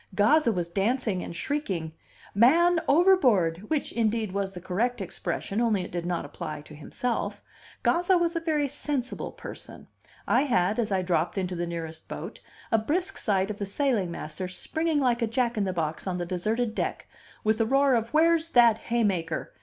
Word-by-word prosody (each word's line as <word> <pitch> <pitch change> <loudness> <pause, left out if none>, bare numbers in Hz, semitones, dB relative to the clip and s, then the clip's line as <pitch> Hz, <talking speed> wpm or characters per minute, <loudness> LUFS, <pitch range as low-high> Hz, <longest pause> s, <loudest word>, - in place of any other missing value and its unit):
Gazza 235 +6 +4
was 175 -4 -2
dancing 200 +1 0
and 170 - -7
shrieking, 185 - -2 0.4
"Man 330 - +5
overboard!" 245 - +3
which, 310 -3 -1
indeed, 225 -2 0
was 195 0 -2
the 180 - -8
correct 225 +7 -1
expression, 195 +3 -3
only 215 -5 +2
it - - -8
did 175 0 -3
not 175 -3 -2
apply 145 +1 -6
to 150 - -14
himself. 235 - -3 0.4
Gazza 355 +2 +3
was 340 0 0
a - - +1
very 310 -3 0
sensible 275 -2 -3
person. - - -10 0.4
I 245 - +4
had, 210 -4 +1
as 220 -3 0
I 190 -1 +1
dropped 175 0 0
into 185 -1 -2
the 175 0 -2
nearest 165 -1 -6
boat, - - -7 0.3
a 225 - +4
brisk 355 - -1
sight 195 -1 0
of 210 - -8
the 200 - -2
sailing 220 -4 0
master, 170 +2 -5
springing 315 - -1
like 245 -3 +1
a 230 - +2
jack 240 +1 0
in 210 -2 0
the 190 - -1
box 160 0 -3
on 180 -1 -1
the 175 - -3
deserted 215 +6 -1
deck, - - -3 0.4
with 220 +1 +2
a - - +3
roar 275 +2 +4
of 230 -1 +1
"Where's 330 +1 +3
that 235 -5 +5
haymaker?" 195 -10 -1
220 Hz, 185 wpm, -27 LUFS, 180-270 Hz, 0.4 s, Man